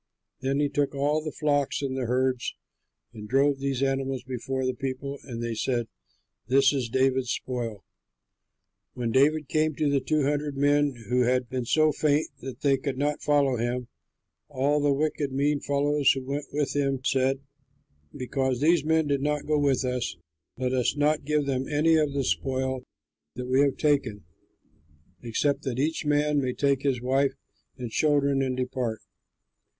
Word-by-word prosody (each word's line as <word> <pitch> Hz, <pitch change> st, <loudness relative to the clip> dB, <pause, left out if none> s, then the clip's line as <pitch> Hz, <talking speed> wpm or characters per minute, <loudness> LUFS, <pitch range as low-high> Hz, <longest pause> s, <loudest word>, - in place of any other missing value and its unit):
Then 135 Hz, +2 st, -1 dB
he 145 Hz, -, +2 dB
took 145 Hz, 0 st, -1 dB
all 145 Hz, +3 st, +1 dB
the 155 Hz, -, -4 dB
flocks 145 Hz, -2 st, 0 dB
and 135 Hz, -1 st, -2 dB
the 130 Hz, -3 st, -2 dB
herds 130 Hz, 0 st, 0 dB, 0.6 s
and 105 Hz, -2 st, -9 dB
drove 135 Hz, +1 st, +3 dB
those 135 Hz, -1 st, -1 dB
animals 135 Hz, -1 st, -1 dB
before 130 Hz, +1 st, -3 dB
the 130 Hz, -, 0 dB
people, 135 Hz, +2 st, -5 dB
and 120 Hz, -3 st, -5 dB
they 115 Hz, -1 st, -2 dB
said, 120 Hz, +1 st, -1 dB, 0.6 s
"This 135 Hz, +2 st, +4 dB
is 130 Hz, -4 st, -1 dB
David's 130 Hz, 0 st, +1 dB
spoil." 120 Hz, -6 st, -4 dB, 1.1 s
When 120 Hz, -2 st, -2 dB
David 145 Hz, +4 st, +3 dB
came 155 Hz, 0 st, +1 dB
to 145 Hz, -1 st, +1 dB
the 140 Hz, -, +3 dB
two 155 Hz, +1 st, 0 dB
hundred 145 Hz, 0 st, -1 dB
men 145 Hz, 0 st, +3 dB
who 125 Hz, 0 st, +3 dB
had 125 Hz, 0 st, +1 dB
been 130 Hz, -2 st, -2 dB
so 155 Hz, +5 st, +3 dB
faint 150 Hz, +1 st, +1 dB
that 130 Hz, 0 st, -8 dB
they 140 Hz, -2 st, +3 dB
could 135 Hz, 0 st, -4 dB
not 145 Hz, +1 st, -1 dB
follow 140 Hz, -3 st, +2 dB
him, 120 Hz, +1 st, -2 dB, 0.6 s
all 145 Hz, +1 st, +1 dB
the 145 Hz, 0 st, +3 dB
wicked, 145 Hz, 0 st, 0 dB
mean 145 Hz, +2 st, +1 dB
fellows 145 Hz, 0 st, +1 dB
who 135 Hz, -, -5 dB
went 140 Hz, +2 st, -3 dB
with 145 Hz, -1 st, -1 dB
him 135 Hz, -2 st, 0 dB
said, 135 Hz, 0 st, +1 dB, 0.7 s
"Because 130 Hz, 0 st, -2 dB
these 160 Hz, +1 st, +3 dB
men 160 Hz, 0 st, +2 dB
did 140 Hz, -2 st, 0 dB
not 150 Hz, 0 st, -1 dB
go 150 Hz, -1 st, +1 dB
with 135 Hz, -2 st, +2 dB
us, 125 Hz, -7 st, -2 dB, 0.4 s
let 130 Hz, 0 st, -1 dB
us 130 Hz, +2 st, +1 dB
not 150 Hz, 0 st, +1 dB
give 150 Hz, 0 st, +1 dB
them 135 Hz, -1 st, -1 dB
any 155 Hz, +2 st, +3 dB
of 150 Hz, -3 st, +1 dB
the 140 Hz, -1 st, 0 dB
spoil 130 Hz, 0 st, -1 dB, 0.5 s
that 125 Hz, -, -5 dB
we 130 Hz, +2 st, +3 dB
have 140 Hz, -2 st, +2 dB
taken, 135 Hz, -, +1 dB, 1.0 s
except 140 Hz, +5 st, 0 dB
that 130 Hz, -3 st, -3 dB
each 155 Hz, +3 st, -1 dB
man 145 Hz, 0 st, +2 dB
may 130 Hz, -1 st, -1 dB
take 140 Hz, -1 st, +1 dB
his 130 Hz, -4 st, 0 dB
wife 135 Hz, +2 st, +1 dB, 0.4 s
and 120 Hz, -3 st, -6 dB
children 140 Hz, -2 st, +2 dB
and 130 Hz, -1 st, -1 dB
depart." 125 Hz, -3 st, -2 dB
135 Hz, 170 wpm, -27 LUFS, 130-145 Hz, 1.1 s, This